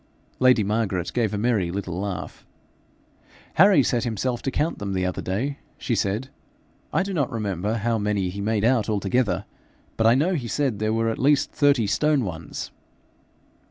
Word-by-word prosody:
Lady 125 -4 +5
Margaret 100 -4 -1
gave 115 -4 +1
a 105 - -2
merry 105 -5 +1
little 90 -1 -4
laugh. 100 -2 -5 1.1
'Harry 190 -5 +6
set 120 -2 0
himself 120 +1 -2
to - - -1
count 155 +5 -1
them 100 -1 -3
the 95 -1 0
other 90 -1 -2
day,' 130 +10 -2 0.2
she 125 - -2
said. 105 +4 -1 0.6
'I - - +2
do 195 0 -4
not 145 -7 0
remember 105 -1 -2
how 115 0 0
many 100 -3 0
he 100 +3 -5
made 105 +1 0
out 115 -2 +2
altogether, 105 +3 0 0.5
but 110 - +3
I 115 - +6
know 160 +8 +2
he 135 -9 -2
said 130 -4 -1
there 110 0 0
were 115 0 +1
at 115 - -3
least 145 +1 +3
thirty 140 -6 +3
stone 150 +6 +2
ones.' 80 -3 -6
115 Hz, 175 wpm, -24 LUFS, 100-130 Hz, 1.1 s, Harry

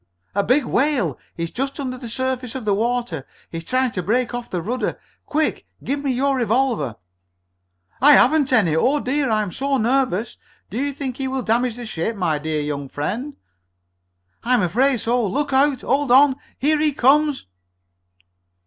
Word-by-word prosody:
"A 200 - +1
big 255 +5 +2
whale! 245 - 0 0.2
He's 170 -1 -4
just 275 +3 -3
under 255 -2 -3
the 245 -2 -8
surface 260 0 -2
of 255 -4 -5
the 205 - +2
water! 230 - -1 0.3
He's 165 -1 -5
trying 255 +6 0
to 185 - -3
break 235 +7 0
off 245 0 -5
the 180 - -2
rudder! 235 +9 -3 0.3
Quick, 310 0 -1 0.2
give 280 +1 -2
me 280 - -1
your 270 +2 +1
revolver!" 230 - 0 1.1
"I 295 +3 +8
haven't 295 -2 +4
any! 200 -11 +3
Oh, 265 - +2
dear! 275 0 0
I'm 215 -3 0
so 275 +7 -1
nervous! 240 -3 0 0.3
Do 220 - -3
you 285 - -1
think 270 -3 -5
he 270 - -2
will 260 -1 -2
damage 235 +1 +1
the 240 0 -7
ship, 220 +1 -3
my 165 -6 0
dear 155 0 -2
young 145 -2 -4
friend?" 230 - -4 1.1
"I'm 245 -3 +2
afraid 245 +7 +2
so! 240 +1 +1
Look 285 +8 -2
out! 270 -1 +3
Hold 275 0 0
on! 270 +1 +6 0.2
Here 300 +2 +2
he 300 -1 +2
comes!" 290 +3 +3
250 Hz, 170 wpm, -21 LUFS, 210-275 Hz, 1.1 s, I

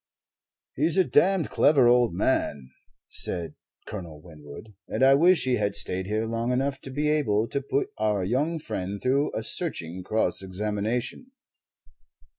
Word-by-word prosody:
"He's 160 +6 +1
a 190 - +6
damned 180 +1 +2
clever 140 -5 +4
old 120 -1 +4
man," 70 -6 -1 0.4
said 85 -3 -3 0.3
Colonel 85 -7 -8
Winwood, 75 +5 -12
"and - - -1
I 135 +1 +7
wish 170 +5 +4
he 130 -1 +1
had 105 -1 -1
stayed 95 0 -1
here 110 +2 -1
long 115 +2 -2
enough 135 +2 -1
to - - -8
be 145 +3 -1
able 115 -8 +1
to 140 - -2
put 140 +1 -2
our 105 -3 +1
young 140 - 0
friend 100 - -5
through 135 +5 +1
a - - -2
searching 85 +3 -3
cross 95 -2 0
examination." 105 - -3
115 Hz, 150 wpm, -26 LUFS, 95-140 Hz, 0.4 s, I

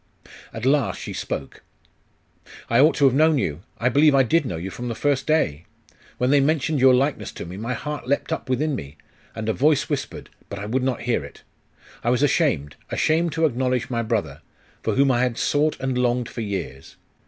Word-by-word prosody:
At 115 +2 -6
last 140 -1 +2
she - - -6
spoke. 70 - -5 1.1
'I 115 - +4
ought 150 +4 +5
to 145 - +3
have 135 - +5
known 155 +2 +4
you, 80 - -2 0.2
I 120 - 0
believe 145 +3 +4
I 135 - +5
did 150 +4 +1
know 85 - -3
you 95 +4 -5
from 120 +5 -6
the 115 - -3
first 140 0 0
day! 90 - +1 0.5
When 125 +1 +1
they 145 - +5
mentioned 150 +1 +1
your 130 0 +6
likeness 130 -5 0
to - - -7
me, 90 +2 -8
my 115 +5 -3
heart 150 +1 -5
leapt 140 +4 0
up 140 -4 -5
within 145 +4 0
me; 70 - -8 0.4
and 110 0 -5
a 110 - +1
voice 150 +3 +2
whispered.... - - -4 0.2
but 100 - -6
I 100 - -5
would 125 +5 -1
not 130 -1 -1
hear 120 -1 0
it! - - -12 0.6
I 120 - +1
was 125 +3 +2
ashamed 140 - +1
ashamed 165 0 +1
to 160 +1 +2
acknowledge 130 -2 -1
my 115 -1 0
brother, 110 -2 -2 0.4
for - - -1
whom 135 0 +4
I 120 -1 +2
had 125 -2 0
sought 150 +1 +1
and 130 -1 -2
longed 125 -1 0
for 115 - -6
years.... 95 -10 -5
130 Hz, 210 wpm, -23 LUFS, 115-145 Hz, 1.1 s, your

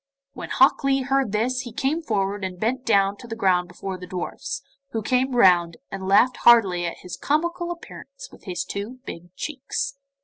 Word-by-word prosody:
When - - -7
Hok - - +4
Lee 270 -1 +2
heard 270 -3 +1
this 240 +5 0
he 245 -2 -6
came 275 +8 -1
forward 200 -7 -1
and 185 -1 -4
bent 250 +5 -1
down 200 -2 +3
to 240 - -11
the 225 - -5
ground 185 -5 +2
before 185 +1 -6
the 180 - -9
dwarfs, 185 +9 -5 0.3
who 225 -1 -2
came 255 +3 +2
crowding 245 - -1
round, 175 -6 +5
and 190 -1 -5
laughed 240 +6 +4
heartily 190 -7 +5
at 170 - -5
his 180 - -6
comical 340 +4 -1
appearance 345 +8 -9
with - - -17
his 180 -3 -3
two 210 +6 -6
big 170 +1 -9
cheeks. 275 0 -4
225 Hz, 195 wpm, -24 LUFS, 190-265 Hz, 0.3 s, round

